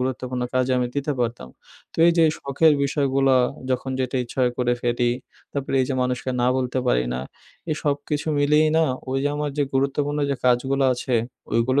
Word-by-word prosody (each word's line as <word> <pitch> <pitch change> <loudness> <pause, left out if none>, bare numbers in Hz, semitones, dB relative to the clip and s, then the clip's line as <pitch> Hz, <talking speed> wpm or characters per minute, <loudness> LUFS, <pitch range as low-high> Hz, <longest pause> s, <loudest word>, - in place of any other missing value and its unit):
গুরুত্বপূর্ণ 125 -1 -2
কাজে 130 0 +2
আমি 125 - +1
দিতে 140 +1 0
পারতাম। 115 - -2 0.4
তো - - -15
এই 170 - +5
যে 165 - +6
শখের 145 +3 +3
বিষয়গুলো 135 -1 +2 0.4
যখন 130 +1 -1
যেটা 130 0 -1
ইচ্ছা 120 - -11
হয় 125 -1 +2
করে 125 -1 +2
ফেলি। 120 0 +1 0.4
তারপরে 140 -1 -3
এই - - +2
যে 135 - -1
মানুষকে 125 0 -2
না 120 - +2
বলতে 130 0 -1
পারি 60 - +2
না 65 - -2 0.5
এই - - +2
সবকিছু 145 +1 -1
মিলিয়েই 150 +2 +4
না - - +4 0.3
ওই 135 - 0
যে - - +3
আমার 150 0 -2
যে - - +4
গুরুত্বপূর্ণ 140 +2 0
যে 140 - 0
কাজগুলো 130 +2 +2
আছে 125 0 -2 0.4
ওইগুলো 120 +5 +2
130 Hz, 190 wpm, -23 LUFS, 125-145 Hz, 0.5 s, যে